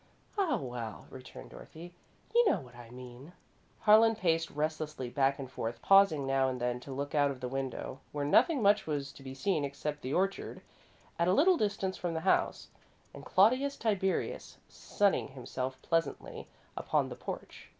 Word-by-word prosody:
"Oh, 390 Hz, -6 st, +1 dB
well," 120 Hz, -4 st, -6 dB
returned 130 Hz, 0 st, -11 dB
Dorothy; 175 Hz, +2 st, -11 dB, 0.4 s
"you 475 Hz, -2 st, +5 dB
know -, -, +2 dB
what 125 Hz, -3 st, -13 dB
I 120 Hz, -1 st, -12 dB
mean." 125 Hz, +5 st, -11 dB, 0.5 s
Harlan 225 Hz, +2 st, +6 dB
paced 165 Hz, -5 st, +1 dB
restlessly 150 Hz, -4 st, -3 dB
back 135 Hz, 0 st, +2 dB
and 135 Hz, -, -6 dB
forth, 115 Hz, -2 st, -5 dB
pausing 195 Hz, -8 st, +5 dB
now 135 Hz, 0 st, +2 dB
and 130 Hz, -1 st, -4 dB
then 120 Hz, 0 st, -1 dB
to 135 Hz, -, -10 dB
look 140 Hz, +2 st, -4 dB
out 145 Hz, -2 st, +3 dB
of 135 Hz, -2 st, -5 dB
the 125 Hz, -, -4 dB
window, 135 Hz, 0 st, -4 dB
where 145 Hz, -1 st, -2 dB
nothing 270 Hz, -, +4 dB
much 205 Hz, -2 st, +4 dB
was 140 Hz, -2 st, -2 dB
to 140 Hz, -, -15 dB
be 135 Hz, 0 st, -8 dB
seen 170 Hz, 0 st, 0 dB
except 145 Hz, +1 st, -4 dB
the 130 Hz, -, -4 dB
orchard, 195 Hz, +5 st, -1 dB, 0.6 s
at 170 Hz, -, +2 dB
a 180 Hz, -, +4 dB
little 360 Hz, -, +5 dB
distance 200 Hz, -, -1 dB
from 175 Hz, -2 st, -3 dB
the 160 Hz, -, -2 dB
house, 190 Hz, -, +1 dB, 0.4 s
and -, -, -11 dB
Claudius 255 Hz, +9 st, +3 dB
Tiberius, 200 Hz, -4 st, -1 dB
sunning 200 Hz, -1 st, 0 dB
himself 130 Hz, 0 st, -5 dB
pleasantly 165 Hz, -4 st, -2 dB, 0.3 s
upon -, -, 0 dB
the -, -, -7 dB
porch. -, -, -8 dB
150 Hz, 170 wpm, -31 LUFS, 130-195 Hz, 0.6 s, Harlan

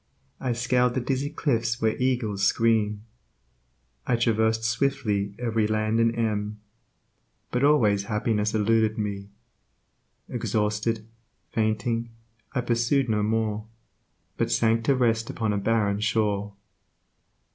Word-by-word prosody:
I 130 Hz, -2 st, -1 dB
scaled 125 Hz, +1 st, +1 dB
the -, -, +2 dB
dizzy 135 Hz, +3 st, -1 dB
cliffs 120 Hz, -7 st, -1 dB
where 110 Hz, -1 st, +1 dB
eagles 120 Hz, -6 st, -1 dB
scream; 105 Hz, -1 st, +2 dB, 1.0 s
I 125 Hz, -, +3 dB
traversed 110 Hz, -1 st, +1 dB
swiftly 115 Hz, -5 st, 0 dB
every 115 Hz, -3 st, 0 dB
land 110 Hz, +1 st, 0 dB
and 115 Hz, 0 st, +2 dB
M. 105 Hz, -2 st, -2 dB, 0.9 s
But 125 Hz, +2 st, 0 dB
always 110 Hz, -9 st, +3 dB
happiness 105 Hz, 0 st, 0 dB
eluded 110 Hz, +1 st, +2 dB
me. 100 Hz, -2 st, -4 dB, 1.0 s
Exhausted, 110 Hz, -1 st, -1 dB, 0.5 s
fainting, 115 Hz, +2 st, 0 dB, 0.4 s
I 125 Hz, -, 0 dB
pursued 120 Hz, +2 st, +1 dB
no 105 Hz, -1 st, +1 dB
more, 110 Hz, 0 st, -1 dB, 0.7 s
But -, -, 0 dB
sank 115 Hz, 0 st, +2 dB
to 140 Hz, -, +3 dB
rest 115 Hz, -3 st, +1 dB
upon 110 Hz, -2 st, -1 dB
a 100 Hz, -, 0 dB
barren 105 Hz, -1 st, +1 dB
shore. 105 Hz, -2 st, 0 dB
110 Hz, 115 wpm, -26 LUFS, 105-120 Hz, 1.0 s, I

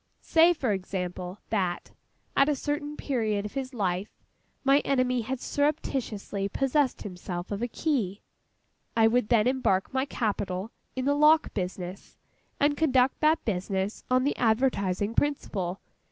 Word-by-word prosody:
Say, 330 Hz, +1 st, +5 dB
for 260 Hz, -8 st, -1 dB
example, 185 Hz, -1 st, -4 dB
that, 185 Hz, -5 st, -1 dB, 0.4 s
at 275 Hz, +1 st, +5 dB
a 295 Hz, -, +2 dB
certain 290 Hz, +2 st, -3 dB
period 215 Hz, -6 st, -1 dB
of 210 Hz, -, -6 dB
his 265 Hz, -1 st, -3 dB
life, 195 Hz, -4 st, -1 dB, 0.5 s
my 275 Hz, +1 st, +5 dB
enemy 255 Hz, -3 st, +1 dB
had 255 Hz, +3 st, -3 dB
surreptitiously 255 Hz, -10 st, -1 dB
possessed 270 Hz, +3 st, +1 dB
himself 180 Hz, -1 st, -6 dB
of 205 Hz, +1 st, -3 dB
a 240 Hz, -, 0 dB
key. 230 Hz, -, -1 dB, 0.7 s
I 225 Hz, -, +6 dB
would 230 Hz, 0 st, +2 dB
then 225 Hz, -3 st, +4 dB
embark 250 Hz, -7 st, +1 dB
my 265 Hz, 0 st, +1 dB
capital 205 Hz, -5 st, -2 dB, 0.2 s
in 260 Hz, 0 st, -2 dB
the 285 Hz, -, +3 dB
lock 305 Hz, +2 st, +4 dB
business, 185 Hz, -1 st, -5 dB, 0.4 s
and 290 Hz, 0 st, +3 dB
conduct 265 Hz, -4 st, +2 dB
that 315 Hz, +1 st, +3 dB
business 195 Hz, 0 st, -2 dB
on 255 Hz, 0 st, +3 dB
the 285 Hz, -, +1 dB
advertising 220 Hz, -4 st, +1 dB
principle. 200 Hz, -11 st, -1 dB
235 Hz, 140 wpm, -28 LUFS, 195-275 Hz, 0.7 s, I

